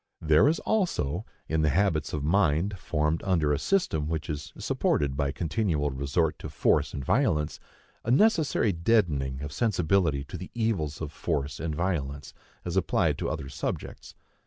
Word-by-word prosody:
There 80 - +4
is 160 +3 +3
also, 110 - 0 0.2
in 80 0 +1
the 75 - +3
habits 80 -2 +1
of 75 - -3
mind 90 +2 +2
formed 75 -1 0
under 80 -6 +2
a 70 - 0
system 80 - +1
which 80 -2 -2
is 75 0 -6
supported 70 -2 0
by 70 -1 0
continual 80 -2 -1
resort 70 +4 0
to - - -6
force - - +2
and 70 - -5
violence, 75 +2 +1 0.4
a - - -4
necessary 150 - +3
deadening 80 - +1
of 75 -1 -6
sensibility 90 - +1
to 70 - -8
the - - -7
evils 95 -11 -1
of 75 -2 -4
force 70 -5 -2
and 80 0 -3
violence, 70 -6 -2 0.3
as 85 0 -3
applied 95 - +1
to - - -1
other 70 - -4
subjects. 70 -1 -5
80 Hz, 160 wpm, -27 LUFS, 75-95 Hz, 0.4 s, There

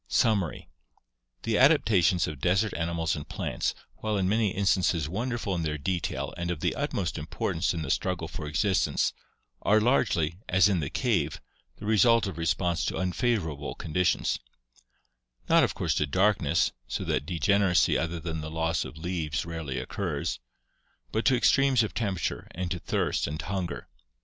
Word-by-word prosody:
Summary 100 -8 +1 0.8
The 115 -2 +1
adaptations 100 - +4
of 75 -3 -6
desert 95 +4 +2
animals 80 -1 -1
and 75 - -7
plants, - - -2 0.2
while 110 -1 -1
in 95 -1 +1
many 110 +1 +2
instances 95 -5 +1
wonderful 115 +3 -2
in 85 - -1
their 75 -1 -2
detail 85 +3 -2
and 85 0 -3
of 85 -3 -2
the - - 0
utmost 85 -5 -2
importance 80 +2 -1
in 85 -2 -3
the 70 - -2
struggle 90 -3 -1
for 80 -2 -6
existence, 85 +6 +1 0.5
are 105 +1 +4
largely, 95 - +1
as 95 +3 +5
in 95 -4 +1
the 70 -3 -2
cave, 90 - 0 0.4
the 105 - -10
result 110 +2 +4
of 95 -4 -5
response 85 +1 0
to - - -2
unfavorable 90 - -1
conditions 90 +3 0 0.5
— - - -36
not - - +6
of - - 0
course - - 0
to 75 - 0
darkness, 95 -2 +2 0.2
so - - -3
that 75 - -1
degeneracy 90 +1 +3
other 85 +1 -1
than 80 -1 -4
the 75 - -5
loss 80 +1 0
of 80 - -9
leaves 80 -3 -2
rarely 80 -5 -4
occurs, 80 -8 -3 0.7
but 110 - -1
to 130 - +5
extremes 135 -1 +4
of 110 - -4
temperature 100 -6 -2
and 90 0 -3
to 90 - -2
thirst - - -1
and 75 +2 -4
hunger. 95 -2 -4
90 Hz, 165 wpm, -28 LUFS, 80-100 Hz, 0.8 s, not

